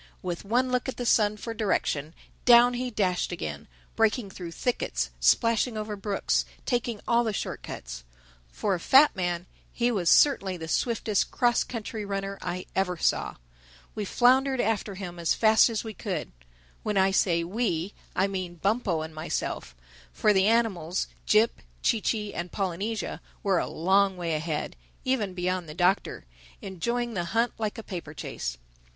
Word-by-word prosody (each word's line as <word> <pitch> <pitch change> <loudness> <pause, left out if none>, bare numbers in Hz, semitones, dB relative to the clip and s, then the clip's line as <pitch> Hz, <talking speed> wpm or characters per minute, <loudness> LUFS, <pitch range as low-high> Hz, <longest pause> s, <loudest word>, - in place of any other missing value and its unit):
With 175 -2 -4
one 250 +5 +1
look 250 +1 0
at - - -5
the 245 - -3
sun 210 -2 +3
for 230 +2 -5
direction, 165 -8 -1 0.3
down 245 0 +7
he 250 +1 -2
dashed 190 -7 0
again, 75 - -5 0.3
breaking 220 -2 +1
through 175 -3 -7
thickets, 245 +8 -1
splashing 230 0 +3
over 215 0 -3
brooks, 200 0 0 0.2
taking 240 -3 -1
all 235 0 +4
the 225 - 0
short - - -4
cuts. - - -7 0.5
For 205 - -1
a 180 - -1
fat 270 - +6
man, 175 -2 -2 0.3
he 245 0 +1
was 185 -7 +1
certainly 195 -10 +4
the 160 -1 -7
swiftest 220 +2 0
cross 240 -1 +2
country 220 -2 -5
runner 195 0 -4
I 180 +1 -4
ever 180 -2 0
saw. - - 0 0.6
We 210 - -3
floundered 260 +5 +3
after 215 -3 0
him 180 -3 -7
as 170 - +1
fast 220 +1 +5
as 225 -2 -2
we 220 -1 -6
could. 190 -7 -4 0.5
When 210 -2 -1
I 190 0 +4
say 170 -3 +2
we, 185 -1 -1 0.2
I 190 - +3
mean 185 -3 -4
Bumpo 195 -2 0
and 160 0 -8
myself; 155 - -4 0.4
for 210 - +3
the 190 0 +4
animals, 195 -7 +1 0.2
Jip, 215 +2 +3 0.2
Chee 225 - +2
Chee 210 -1 -1
and 175 - -5
Polynesia, 195 +3 -3 0.2
were 195 -3 +3
a - - -1
long 190 +3 +2
way 170 -2 -2
ahead—even 160 - -3
beyond 180 -2 -2
the 150 - -8
Doctor—enjoying 180 - -2
the 175 -4 -2
hunt 235 +1 +2
like 215 -2 -2
a 225 - -6
paper 170 -7 -7
chase. - - -5
200 Hz, 160 wpm, -27 LUFS, 175-230 Hz, 0.6 s, down